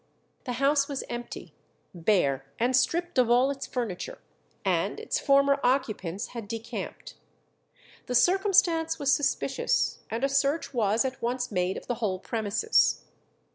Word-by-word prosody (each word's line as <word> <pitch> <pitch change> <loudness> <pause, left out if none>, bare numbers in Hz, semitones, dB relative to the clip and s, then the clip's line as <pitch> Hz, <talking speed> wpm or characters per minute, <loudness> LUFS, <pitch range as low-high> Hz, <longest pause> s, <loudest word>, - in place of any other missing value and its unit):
The 250 - -3
house 280 +2 +2
was 280 -2 -4
empty, 240 0 -7 0.4
bare 165 -7 +1
and 245 +3 +1
stripped 345 +3 +1
of 245 -2 +3
all 250 +3 +4
its 275 -1 -6
furniture, 245 - -4 0.5
and - - 0
its - - -2
former 280 0 +3
occupants 220 -7 -1
had 230 -4 -7
decamped. 225 +1 -6 0.9
The 250 - -2
circumstance 350 - +3
was 280 -2 +2
suspicious, 290 - 0
and 230 +3 -3
a - - +4
search 275 +3 0
was 225 0 +2
at 265 0 -4
once 245 +1 -2
made 180 -1 0
of - - -9
the 245 -1 -4
whole 195 -4 0
premises. 185 - +1
250 Hz, 140 wpm, -27 LUFS, 215-280 Hz, 0.9 s, all